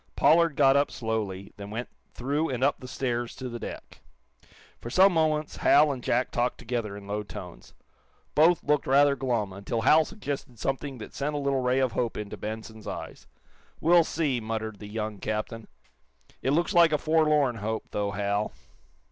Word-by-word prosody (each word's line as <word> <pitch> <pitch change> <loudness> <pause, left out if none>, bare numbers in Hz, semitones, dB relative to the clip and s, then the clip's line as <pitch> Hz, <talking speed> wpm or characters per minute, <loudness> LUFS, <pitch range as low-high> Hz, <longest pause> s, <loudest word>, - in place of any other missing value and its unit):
Pollard 165 -1 +4
got 135 -1 +5
up 140 +1 +3
slowly, 105 -5 -4
then 100 0 -8
went 115 +3 -4 0.3
through 145 +6 -1
and 130 -1 -2
up 140 - +2
the 130 - -9
stairs 120 -2 -2
to 130 - -6
the 120 -1 -6
deck. - - -9 0.8
For 120 - -7
some 190 +8 +5
moments 155 -2 0
Hal 150 +1 +5
and 130 -3 -5
Jack 125 +2 +1
talked 120 +1 0
together, 115 -4 -3
in 100 - -11
low 105 +1 -2
tones. 105 - -10 0.6
Both 165 +3 +4
looked 150 -1 +1
rather 140 +1 +5
glum, 120 -7 -1
until 100 +4 -3
Hal 155 +7 +6
suggested 145 - -6
something 135 +2 -3
that 110 - -9
sent 150 +2 -2
a - - 0
little 140 -2 0
ray 125 +1 +1
of 130 -2 +2
hope 115 0 -2
into 105 -1 -5
Benson's 110 0 -7
eyes. - - -7 0.5
"We'll 170 +1 +5
see," 150 -6 -1
muttered 110 -1 -4
the 105 - -8
young 105 -1 -4
captain. 110 +1 -4 0.7
"It 135 - +1
looks 170 +3 +1
like 170 -2 +6
a 150 - +3
forlorn 150 -5 +2
hope, 110 +1 -3
though, 105 -1 -1
Hal." 100 +1 -1
125 Hz, 180 wpm, -27 LUFS, 110-145 Hz, 0.8 s, Hal